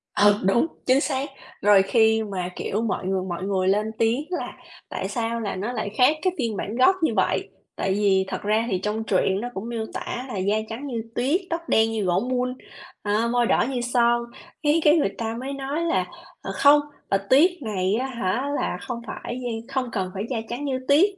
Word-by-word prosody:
Ừ, 205 0 +6
đúng, 215 - +3 0.2
chính 265 +2 +4
xác. 275 0 -1 0.3
Rồi 205 -1 +6
khi 220 +1 +3
mà, 185 -3 -3
kiểu, 210 +3 -2
mọi 215 -4 -2
người 190 -1 0
mọi 175 +1 -4
người 190 -1 0
lên 210 +3 +2
tiếng 230 +6 +1
là 355 - -3 0.4
"Tại - - -3
sao 235 -2 -2
là 210 - -3
nó 210 +6 -3
lại 215 -3 -2
khác 295 +5 +5
cái 370 -1 +1
phiên 230 -5 -1
bản 210 - -4
gốc 260 +10 +5
như - - +3
vậy?" - - +1 0.3
Tại 190 - 0
vì 195 -2 +3
thật - - -4
ra 215 +2 +1
thì 185 - +1
trong 215 +1 -1
truyện 195 -1 +1
nó 245 - -3
cũng 215 +5 -5
miêu 225 -2 -3
tả 250 - -4
là 225 - -5
"da 200 +3 +1
trắng 255 +6 -5
như 235 -4 -3
tuyết, 290 +10 +1
tóc 335 0 -2
đen 225 0 +4
như 220 -2 -1
gỗ 180 +1 +2
mun, 250 0 0 0.5
à, 210 +3 +1
môi 245 -1 +3
đỏ - - +3
như 250 -3 -2
son." 240 -1 +2 0.4
Cái 300 +2 +3
cái 305 +2 +7
người 200 -10 0
ta 225 -1 -2
mới 270 +2 -4
nói 275 +4 -3
là 335 +1 +1 0.4
"Ờ, - - -5
không, 290 +1 +6 0.3
Bạch 195 0 +2
Tuyết 310 +8 +6
này 200 -3 0
á 260 +3 -1
hả 240 +2 -1
là - - -1
không 235 -2 -5
phải 245 +3 -5
da 245 - -2 0.2
không 255 -2 0
cần 185 -3 -2
phải 195 +2 -3
da 250 - -1
trắng 255 +5 -4
như 260 -2 -1
tuyết. 315 +9 +6
230 Hz, 220 wpm, -24 LUFS, 205-265 Hz, 0.5 s, cái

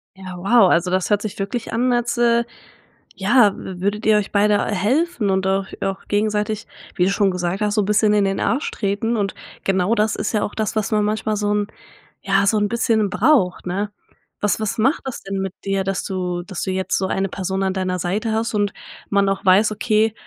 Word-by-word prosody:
Ja, 185 -1 -9
wow, 200 +2 +4
also 175 +2 +2
das 185 0 0
hört 205 -1 +2
sich 215 -2 -5
wirklich 210 +4 -3
an 245 +2 +1
als, 240 0 0
äh, 235 0 +3 0.7
ja 210 +1 +4
w 180 -2 -8
würdet 205 +3 -1
ihr 215 0 +5
euch 210 -1 -2
beide 205 0 +3
helfen 230 - 0
und 190 0 +1
auch 190 0 0
auch 195 0 -3
gegenseitig, 210 +1 -1 0.3
wie 180 - +2
du - - +2
schon 200 -1 +2
gesagt 180 +1 -2
hast, 210 0 +1
so 210 - +2
bisschen 210 +1 +3
in 205 -1 +3
den 195 0 0
Arsch 265 +5 0
treten 210 +3 -1
und 200 -2 -1 0.3
genau 190 +2 +2
das 215 0 +1
ist - - -2
ja 215 - 0
auch - - -4
das, 220 -1 -2
was 215 0 -1
man 210 -1 +2
manchmal 215 +1 -1
so 205 0 -1
'n 205 0 0 0.5
ja, 195 0 +2
so 215 - +3
'n 205 -1 +1
bisschen 225 -2 +1
braucht, 200 -4 +2
ne? 200 +3 -2 0.5
Was 205 -1 +1
was 215 - -2
macht 260 +8 +2
das 265 - -5
denn 195 0 -4
mit 190 -1 -3
dir, 195 0 0
dass 195 0 -2
du 180 -2 -3
dass 185 +1 -6
du 190 - -2
jetzt 190 0 -1
so 190 - -1
eine 195 +1 -1
Person 190 +1 -3
an 190 -1 0
deiner 185 -1 -2
Seite 205 +6 -1
hast 225 +1 -1
und 205 -1 +1 0.4
man 200 -1 +2
auch 195 0 -1
weiß, 195 +3 +5
okay, 215 0 +1
205 Hz, 220 wpm, -21 LUFS, 190-215 Hz, 0.7 s, ihr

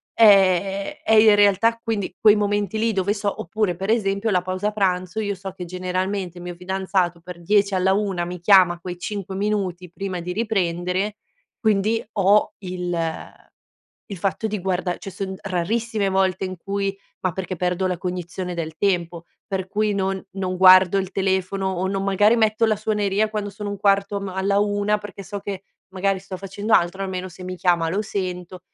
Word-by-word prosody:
ehm, 195 -2 +4
è 220 - +2
in 215 -1 +7
realtà 205 +3 +3
quindi 215 -6 -2
quei 215 -1 +6
momenti 205 0 0
lì 225 +1 +2
dove 195 +1 +1
so 200 -1 -3
oppure 200 0 -1
per 195 +3 -4
esempio 200 -1 0
la 180 -2 +2
pausa 185 +3 -2
pranzo, 185 -1 0
io 205 -1 -2
so 195 +1 -7
che 185 - -7
generalmente 185 +1 -3
il - - -9
mio 175 0 -6
fidanzato 185 -1 -1
per 175 0 -10
10 200 +2 +2
alla 185 +1 +3
1 195 -4 -1
mi 180 +1 -6
chiama 180 -2 +5
quei 180 0 -6
5 195 -1 -5
minuti 195 -3 -2
prima 185 0 -4
di 180 +1 -4
riprendere, 190 -2 -1 0.5
quindi 220 +1 +2
ho 200 +1 +3
il 180 -2 -4 1.1
il 200 - -7
fatto 195 +5 -1
di 210 -1 -3
guarda 180 -1 -1
cioè 195 - -8
son 190 0 -4
rarissime 210 +4 -1
le - - +2
volte 190 -1 +1
in 185 0 -6
cui 195 +2 -2 0.3
ma 185 - 0
perché 185 0 -4
perdo 180 +2 0
la 180 -1 -2
cognizione 180 0 -4
del 160 -2 -5
tempo, 175 -4 0 0.2
per 190 -1 -3
cui 210 +1 0
non 190 -1 -1
non 185 -1 -3
guardo 185 0 +7
il 190 -1 -4
telefono 190 0 0
o 185 0 -1
non 195 0 -2
magari 205 +3 +4
metto 220 0 +3
la 220 -1 +2
suoneria 210 0 0
quando 210 -1 -3
sono 205 +1 -6
1/4 200 0 +1
ma 195 -2 -5
alla 200 +1 +1
1 205 0 +1
perché 205 -1 -9
so 200 +2 -6
che 195 -1 -6 0.3
magari 195 0 0
sto 195 0 -8
facendo 200 +3 -3
altro, 175 +3 +3
almeno 185 -1 -4
se 180 +1 -12
mi 185 0 -5
chiama 175 -3 +2
lo 195 +5 0
sento. 185 -3 -4
195 Hz, 185 wpm, -22 LUFS, 180-205 Hz, 1.1 s, in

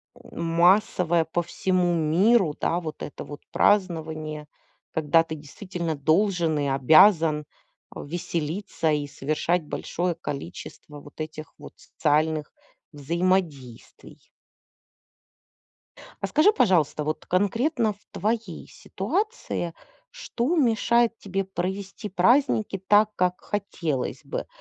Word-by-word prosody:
э, - - -18 0.2
массовое 170 0 +3
по 175 +2 -2
всему 180 0 0
миру. 170 +2 +3
Да. 170 - 0
Вот 155 -3 -7
это - - -7
вот 145 0 -9
празднование, 160 -6 0 0.4
когда 160 +1 +3
ты 160 -1 -6
действительно 170 +2 -5
должен 165 +2 +1
и 145 - 0
обязан, 155 +3 +5 0.5
э, - - -6
веселиться 170 +1 -2
и 145 -1 0
совершать 155 +5 -1
большое 175 +3 -3
количество 150 -1 -8
вот 145 +2 -11
этих 155 -1 -7
вот - - -11
социальных 155 0 0 0.4
взаимодействий. 155 -4 -3 1.9
А 195 - -1
скажи, 305 - +4
пожалуйста, 180 - +2
вот 155 +1 -3
конкретно 225 - +1
в 200 - -27
твоей 215 -3 -3
ситуации, 300 - -3 0.4
что 255 +9 -2
мешает 235 -3 +2
тебе 195 0 -2
провести 190 +2 -5
праздники 215 0 +2
так, 210 +1 +5
как 180 0 0
хотелось 170 -9 -3
бы? - - -5
175 Hz, 105 wpm, -25 LUFS, 155-200 Hz, 1.9 s, обязан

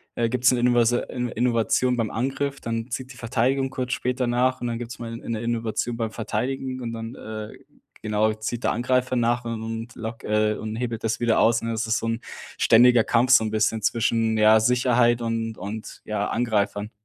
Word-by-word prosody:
äh, 115 -1 +1
gibt's 125 +1 +3
'ne 125 - +1
Inovase 120 0 +3
In 125 -1 -3
Innovation 120 +1 +1
beim 115 -2 -1
Angriff, 135 +3 -2
dann 115 +1 -4
zieht 130 +1 -4
die 125 - -13
Verteidigung 130 +3 0
kurz 130 -1 -3
später 125 0 -1
nach 125 +2 +1
und 120 - -2
dann 115 -1 -2
gibt's 120 +4 -7
mal 115 -1 -6
'ne 115 -2 -4
Innovation 115 0 -2
beim 115 -2 -2
Verteidigen 130 +4 -3
und 115 -1 -4
dann, 115 +2 -6
äh, 110 -1 -7 0.5
genau, 110 0 +1
zieht 110 +2 -5
der - - +2
Angreifer 125 +2 0
nach 120 0 +1
und 115 -1 -4
und 115 +1 -6
lock 115 0 -6
äh, 105 0 +1
und 110 0 -5
hebelt 115 -1 -4
das 115 0 -1
wieder 115 -2 +2
aus, 115 0 +3
ne? 115 - -2
Das 110 0 -2
ist 115 +2 +1
so - - -4
'n 115 0 -1 0.4
ständiger 120 0 +6
Kampf, 120 +3 +2
so 130 - +7
'n 110 - -1
bisschen 110 +1 +1
zwischen, 115 0 +1
ja, 110 +1 +6
Sicherheit 120 0 +3
und 115 -1 -2
und 105 +2 -7
ja, 105 -1 -2
Angreifern. 105 -3 -1
115 Hz, 200 wpm, -24 LUFS, 110-125 Hz, 0.5 s, so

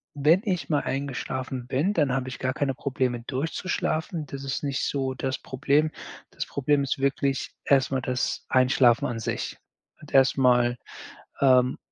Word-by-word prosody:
wenn 155 +7 +4
ich 180 -4 -1
mal 145 -2 +2
eingeschlafen 130 -2 -4
bin, 155 +12 +1
dann 145 -8 +2
habe 130 -1 -1
ich 125 - -8
gar 130 0 -1
keine 140 -3 -1
Probleme 125 -3 -1
durchzuschlafen. 160 +2 -2
Das 140 0 -7
ist 135 +2 -3
nicht 140 -2 -1
so 135 -2 -1
das 130 0 -2
Problem. 145 +4 +1 0.4
Das - - -4
Problem 140 +1 +1
ist 135 - -1
wirklich 140 0 0
erstmal 135 -1 +2
das 125 -1 -2
Einschlafen 130 -2 +4
an 115 -2 -4
sich. - - -3 0.4
Und 150 - -14
erstmal, 125 -2 +4 0.6
ähm, 130 -2 +4
135 Hz, 150 wpm, -26 LUFS, 130-145 Hz, 0.6 s, wenn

